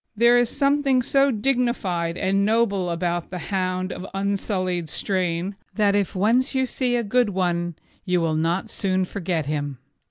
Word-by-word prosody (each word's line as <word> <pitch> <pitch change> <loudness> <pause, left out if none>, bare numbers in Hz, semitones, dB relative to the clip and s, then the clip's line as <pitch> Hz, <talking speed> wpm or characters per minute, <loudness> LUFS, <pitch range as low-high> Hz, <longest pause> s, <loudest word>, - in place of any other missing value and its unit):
There 235 +3 +5
is 245 -1 +3
something 275 -2 +2
so 275 +3 +3
dignified 215 -9 0
and 195 0 +1
noble 200 -4 +1
about 175 0 -2
the 180 - -5
hound 185 0 -2
of - - -7
unsullied 190 -3 -1
strain 185 +1 -1 0.2
that 205 -2 +3
if 200 -2 0
you 185 - -2
once 240 +5 +3 0.2
see 250 -1 -1
a 240 - +1
good 240 +2 +2
one 175 -3 -1 0.3
you 180 -1 +1
will 165 -2 0
not 170 +7 -1
soon 190 -2 0
forget 175 -4 -2
him. 145 -2 -3
195 Hz, 160 wpm, -23 LUFS, 175-230 Hz, 0.3 s, There